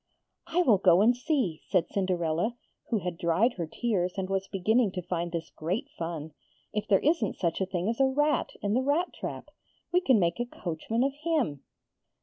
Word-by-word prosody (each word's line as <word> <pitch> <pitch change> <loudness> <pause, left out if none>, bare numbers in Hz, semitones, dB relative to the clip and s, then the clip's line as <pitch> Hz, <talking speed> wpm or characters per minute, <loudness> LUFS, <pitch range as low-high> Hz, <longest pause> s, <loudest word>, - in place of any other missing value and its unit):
'I 345 +2 +2
will 220 - +4
go 180 -1 +5
and 240 +4 +5
see,' 250 - -1
said 180 -4 +1
Cinderella, 180 +2 0 0.3
who 230 - +2
had 175 -2 -4
dried 185 +9 +2
her 170 -2 -2
tears 185 -2 -1
and 190 0 -2
was 195 0 -1
beginning 215 +3 +2
to 180 - -3
find 170 0 -2
this 165 -1 -4
great 195 - -2
fun, 160 -2 -5 0.4
'if 210 -1 -2
there 195 - +4
isn't 305 - +1
such 170 0 -1
a 190 - +1
thing 185 -1 -2
as 230 +2 -1
a 270 - +5
rat 295 0 +1
in 205 0 +1
the 250 - +3
rat 295 +7 +1
trap. - - -6 0.4
We 360 +1 +3
can 260 -9 +4
make 170 +3 +1
a 240 - -1
coachman 205 +4 -2
of 275 0 +1
him.' 295 - 0
195 Hz, 195 wpm, -28 LUFS, 175-250 Hz, 0.4 s, go